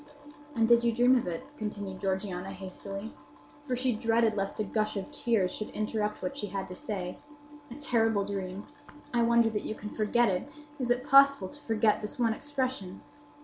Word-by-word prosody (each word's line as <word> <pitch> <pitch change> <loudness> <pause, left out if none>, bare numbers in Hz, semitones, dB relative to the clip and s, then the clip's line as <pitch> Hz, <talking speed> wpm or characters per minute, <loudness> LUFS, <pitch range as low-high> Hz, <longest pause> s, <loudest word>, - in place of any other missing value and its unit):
"And 225 -1 +3
you 235 0 +7
did 235 -1 +1
dream 245 +2 +5
of 245 - +1
it?" 165 -2 -3
continued 205 -3 -5
Georgiana, 190 -1 -2
hastily; 195 +3 -7 0.5
for 255 -3 -1
she 255 0 +1
dreaded 225 0 +2
lest 195 0 -2
a - - +2
gush 215 0 -1
of 200 +9 -5
tears 230 -10 +1
should 215 - -5
interrupt 215 0 -2
what 275 - -2
she 245 -7 -4
had 195 0 -4
to 180 - -7
say. 180 -3 -4 0.5
"A 240 - -8
terrible 225 -7 +1
dream! 195 0 -4 0.5
I 240 - +3
wonder 235 -1 +4
that 210 - -1
you 215 - -4
can 210 0 -7
forget 230 +2 +3
it. 190 +7 -1 0.3
Is 250 -2 -2
it 245 +1 +2
possible 275 -7 +6
to 290 - -12
forget 215 -3 +2
this 210 - -5
one 230 -3 +2
expression? 260 -8 -3
215 Hz, 190 wpm, -30 LUFS, 195-240 Hz, 0.5 s, you